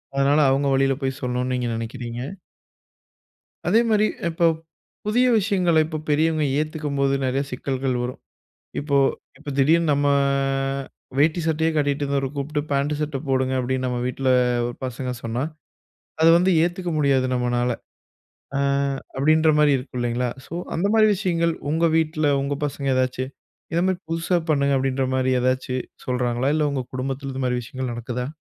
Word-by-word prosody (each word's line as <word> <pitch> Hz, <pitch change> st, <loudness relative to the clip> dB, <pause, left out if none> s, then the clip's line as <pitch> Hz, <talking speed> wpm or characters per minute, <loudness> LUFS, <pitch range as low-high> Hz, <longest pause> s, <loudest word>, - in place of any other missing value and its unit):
அதனால, 140 Hz, +2 st, +3 dB
அவங்க 140 Hz, +1 st, +1 dB
வழியில 135 Hz, 0 st, +3 dB
போய் 135 Hz, +1 st, -2 dB
சொல்லணும்னு 125 Hz, 0 st, -1 dB
நீங்க 125 Hz, -1 st, -1 dB
நினைக்கிறீங்க. 120 Hz, +1 st, -5 dB, 1.5 s
அதேமாதிரி 220 Hz, -2 st, +4 dB, 0.2 s
இப்ப, 170 Hz, +1 st, +1 dB, 0.6 s
புதிய 240 Hz, +4 st, +3 dB
விஷயங்கள 185 Hz, -5 st, +2 dB
இப்ப 155 Hz, -1 st, -4 dB
பெரியவங்க 155 Hz, +1 st, +2 dB
ஏத்துக்கும்போது 150 Hz, -3 st, -1 dB
நிறைய 130 Hz, +1 st, 0 dB
சிக்கல்கள் 130 Hz, 0 st, -2 dB
வரும். 125 Hz, +1 st, -5 dB, 0.6 s
இப்போ 140 Hz, -1 st, +1 dB, 0.4 s
இப்ப 150 Hz, 0 st, -8 dB
திடீர்னு 160 Hz, +4 st, +4 dB
நம்ம 145 Hz, 0 st, +2 dB, 1.1 s
வேட்டி 155 Hz, +4 st, +3 dB
சட்டையே 160 Hz, 0 st, +1 dB
கட்டிகிட்டு 145 Hz, -1 st, +1 dB
இருந்தவர 140 Hz, -1 st, 0 dB
கூப்ட்டு, 150 Hz, +2 st, -2 dB
பேண்ட் 140 Hz, +2 st, +1 dB
சட்டை 150 Hz, -2 st, -2 dB
போடுங்க 130 Hz, -1 st, +1 dB
அப்படின்னு 130 Hz, +1 st, -1 dB
நம்ம 125 Hz, -1 st, -2 dB
வீட்டில 130 Hz, +1 st, -1 dB, 0.4 s
ஒரு 120 Hz, -, -6 dB
பசங்க 125 Hz, 0 st, -4 dB
சொன்னா, 115 Hz, +3 st, -2 dB, 0.8 s
அத 160 Hz, -, +6 dB
வந்து 185 Hz, +2 st, +3 dB
ஏத்துக்க 175 Hz, +1 st, -2 dB
முடியாது 135 Hz, -3 st, +3 dB
நம்மனால. 125 Hz, 0 st, 0 dB, 0.9 s
அ -, -, +1 dB, 0.6 s
அப்படின்ற 155 Hz, +3 st, +4 dB
மாதிரி 150 Hz, -1 st, +5 dB
இருக்கும் 125 Hz, -1 st, -6 dB
இல்லைங்களா! 120 Hz, +1 st, 0 dB, 0.2 s
ஸோ -, -, -9 dB, 0.2 s
அந்த 185 Hz, +5 st, +1 dB
மாதிரி 215 Hz, -1 st, +6 dB
விஷயங்கள், 170 Hz, -4 st, 0 dB, 0.2 s
உங்க 165 Hz, +2 st, +2 dB
வீட்டில 155 Hz, -2 st, +1 dB
உங்க 140 Hz, +1 st, -1 dB
பசங்க 140 Hz, -1 st, -3 dB
ஏதாச்சு, 130 Hz, 0 st, 0 dB, 0.5 s
இதமாதிரி 180 Hz, +2 st, +1 dB
புதுசா 165 Hz, +2 st, +1 dB
பண்ணுங்க, 140 Hz, -1 st, +2 dB
அப்படின்ற 135 Hz, 0 st, 0 dB
மாதிரி 130 Hz, 0 st, +1 dB
ஏதாச்சு 130 Hz, 0 st, 0 dB, 0.3 s
சொல்றாங்களா? 125 Hz, +1 st, 0 dB
இல்ல 150 Hz, -1 st, +2 dB
உங்கள் 130 Hz, -3 st, -3 dB
குடும்பத்தில, 135 Hz, +1 st, -3 dB
இந்த 130 Hz, 0 st, -3 dB
மாதிரி 125 Hz, -1 st, 0 dB
விஷயங்கள் 130 Hz, +1 st, -5 dB
நடக்குதா? 125 Hz, +1 st, -4 dB
140 Hz, 145 wpm, -23 LUFS, 130-155 Hz, 1.5 s, அத